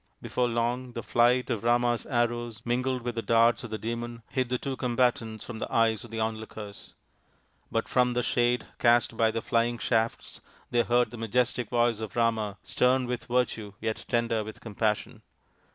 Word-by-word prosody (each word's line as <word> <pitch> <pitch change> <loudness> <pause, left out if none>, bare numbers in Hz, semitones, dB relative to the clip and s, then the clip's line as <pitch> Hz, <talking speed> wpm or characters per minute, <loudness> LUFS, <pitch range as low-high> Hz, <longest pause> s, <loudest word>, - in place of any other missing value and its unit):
Before 125 -1 0
long 120 +2 -1
the 115 - -5
flight 120 +2 +3
of 115 -2 -2
Rama's 120 0 +2
arrows 120 -2 -1
mingled 125 +1 0
with 120 0 -2
the 115 - -2
darts 115 +3 +3
of 120 - -6
the 110 - -3
Demon 115 +1 -5
hid 130 -2 0
the 125 - +1
two 135 +1 -4
combatants 120 -3 0
from 115 -2 -7
the - - -4
eyes 115 -1 +2
of 120 - -11
the 115 0 -5
onlookers. 110 -2 -5 0.8
But 115 0 0
from 125 -1 +2
the 125 0 0
shade 120 +1 +1
cast 120 -1 +4
by 110 -1 +3
the 115 0 -3
flying 120 0 +1
shafts 115 -1 -1 0.3
they 120 -1 +4
heard 120 -1 +2
the 120 - -8
majestic 120 +1 0
voice 120 -2 +2
of 110 -4 -6
Rama, 110 -4 +1
stern 125 +1 +2
with 125 -1 -3
virtue 120 -4 -1
yet 110 -1 -3
tender 115 -2 +1
with 110 +1 -9
compassion. 105 -1 -2
120 Hz, 180 wpm, -28 LUFS, 115-120 Hz, 0.8 s, cast